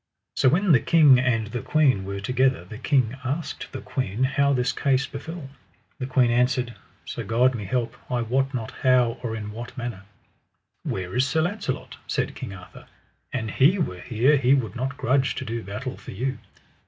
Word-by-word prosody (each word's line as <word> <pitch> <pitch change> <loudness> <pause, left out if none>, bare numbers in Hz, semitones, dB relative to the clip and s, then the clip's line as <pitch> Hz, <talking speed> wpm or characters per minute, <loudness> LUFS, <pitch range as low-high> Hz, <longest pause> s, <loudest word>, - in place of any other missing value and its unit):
So 130 - +4
when 180 +6 +3
the 135 - +7
king 145 -1 +6
and 120 -4 +1
the 115 +3 -4
queen 135 -11 +2
were 100 0 -4
together 125 -3 +1
the 110 +4 -9
king 130 -4 +2
asked 140 +6 -4
the - - -6
queen 125 -3 -2
how 140 +1 +2
this 125 -1 +1
case 135 -1 +1
befell. 150 +2 -7 0.5
The 130 - -3
queen 125 -2 +3
answered: 125 0 +1 0.3
So - - -5
God 125 +3 +3
me 105 -4 -5
help, 115 +3 -1
I 125 -2 0
wot 135 +4 0
not 115 -5 -4
how 125 -2 +3
or 115 -3 -3
in 105 -1 -5
what 120 +4 -8
manner. 120 -5 -5 0.8
Where 90 0 -4
is 130 +2 +3
Sir 160 +4 +1
Launcelot? 180 -7 -3
said - - -1
King - - -7
Arthur; 95 -2 -12 0.4
an 115 -4 -2
he 145 - +4
were 90 - -2
here 125 +5 +3
he 130 0 +4
would 110 -7 -2
not 135 +3 -3
grudge 135 +1 +1
to 130 - -4
do 115 0 -3
battle 110 +6 -6
for - - -10
you. 130 +6 -2
125 Hz, 190 wpm, -25 LUFS, 115-135 Hz, 0.8 s, the